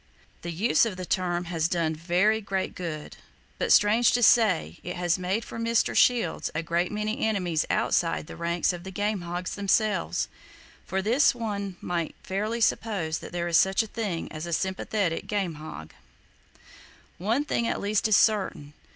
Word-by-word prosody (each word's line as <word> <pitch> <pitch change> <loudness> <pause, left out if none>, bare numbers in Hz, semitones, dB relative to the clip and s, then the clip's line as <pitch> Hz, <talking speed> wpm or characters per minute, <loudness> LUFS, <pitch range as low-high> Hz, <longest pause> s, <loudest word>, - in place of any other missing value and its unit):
The 170 - -5
use 190 +8 +2
of 195 -5 -5
the 185 - -5
term 175 -1 -1
has 165 -2 0
done 165 -2 0
very 180 +7 +1
great 195 -2 -2
good; 160 -4 -6 0.4
but, - - 0
strange 220 +3 +5
to 245 - +2
say, 215 -7 +4
it 180 - -5
has 175 0 0
made 190 +5 -1
for - - -7
Mr. 230 0 +1
Shields 235 -9 +2
a 155 - -1
great 170 +2 0
many 215 +4 -2
enemies 180 -7 0
outside 165 -3 +1
the - - -10
ranks 170 +1 0
of 175 -1 -7
the 190 - -7
game 205 +1 -1
hogs 175 +1 -4
themselves! 205 +1 +1 0.6
From 190 0 -1
this 245 +6 +4
one 200 -5 -4
might 170 -2 -3
fairly 215 +5 -2
suppose 195 -8 0
that - - -9
there 175 0 -2
is 170 -1 +4
such 190 +3 +3
a - - -8
thing 205 -8 -3
as 155 +2 -6
a 170 - -3
sympathetic 190 0 -1
game 195 -5 -1
hog! 80 - -9 1.3
One 230 +10 0
thing 235 -5 0
at - - -1
least 210 +2 +1
is 215 - +5
certain. 190 -9 +1
190 Hz, 175 wpm, -27 LUFS, 170-215 Hz, 1.3 s, strange